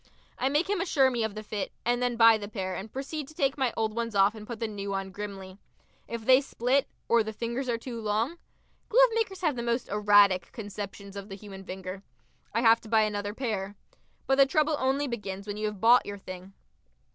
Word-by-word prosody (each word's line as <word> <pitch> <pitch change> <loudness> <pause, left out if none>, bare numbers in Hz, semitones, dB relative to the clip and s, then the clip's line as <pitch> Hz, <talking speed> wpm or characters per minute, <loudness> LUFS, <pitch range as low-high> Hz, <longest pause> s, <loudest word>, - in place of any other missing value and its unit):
I 260 - +2
make 295 +6 +1
him 400 -3 0
assure 275 -8 +3
me 235 -2 -1
of 220 -2 -3
the 215 - -6
fit, 210 -2 -4
and 240 +1 +1
then 245 -1 0
buy 230 -1 +7
the 205 - -6
pair 190 -3 -4
and 210 +3 -7
proceed 280 +2 -5
to 310 - -14
take 275 -2 +1
my 260 -4 +1
old 220 -1 0
ones 230 -2 -3
off 195 +1 +5
and 215 -1 -10
put 235 -3 -6
the 225 - -1
new 200 -2 -4
on 195 0 -4
grimly. 195 -1 -7 0.5
If 230 -1 -6
they 260 +2 +7
split 270 0 0 0.2
or 235 0 +4
the 220 0 -3
fingers 235 +4 -3
are 235 - +1
too 235 0 -7
long 225 +10 -1 0.5
glovemakers 450 -5 +3
have 310 -6 +1
the 240 - -3
most 235 +1 -1
erratic 205 -3 +4
conceptions 200 -2 -7
of 200 +1 -7
the 195 - -6
human 195 -1 -10
finger 190 0 -7 0.5
I 230 - 0
have 230 -1 +5
to 220 - -12
buy 220 -1 +4
another 205 -1 -2
pair. 205 -6 -3 0.5
But 270 0 +2
the 275 - +7
trouble 305 +2 +2
only 270 +2 +1
begins 200 -5 -5
when 205 0 -5
you 215 0 -1
have 210 -2 -5
bought 235 +4 +5
your 205 0 -5
thing. 185 0 -10
225 Hz, 220 wpm, -28 LUFS, 205-260 Hz, 0.5 s, buy